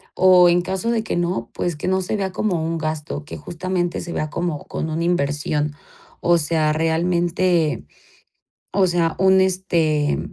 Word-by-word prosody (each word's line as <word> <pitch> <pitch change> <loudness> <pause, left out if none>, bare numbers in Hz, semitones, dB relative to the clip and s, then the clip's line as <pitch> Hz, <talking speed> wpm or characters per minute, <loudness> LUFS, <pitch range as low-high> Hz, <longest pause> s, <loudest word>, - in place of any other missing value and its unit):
O 185 -1 +6
en 175 0 +4
caso 190 +5 -2
de 225 -2 0
que 220 - -3
no, 170 -10 -1 0.3
que 155 - -4
no 190 0 +1
se 185 - -2
vea 195 -2 -2
como 180 -4 -1
un 165 +1 -2
gasto 155 -1 -4
que - - -8
justamente 175 0 -3
se 170 - -6
vea 155 - -2
como 170 -2 -3
con 160 - -4
una 165 +2 -1
inversión 150 -2 0 0.5
o 175 0 +4
sea 155 -1 +1
realmente 170 - +1 0.9
o 190 -1 +3
sea 170 -2 0
un 190 0 +5
este 170 -6 +1
170 Hz, 165 wpm, -21 LUFS, 155-185 Hz, 0.9 s, O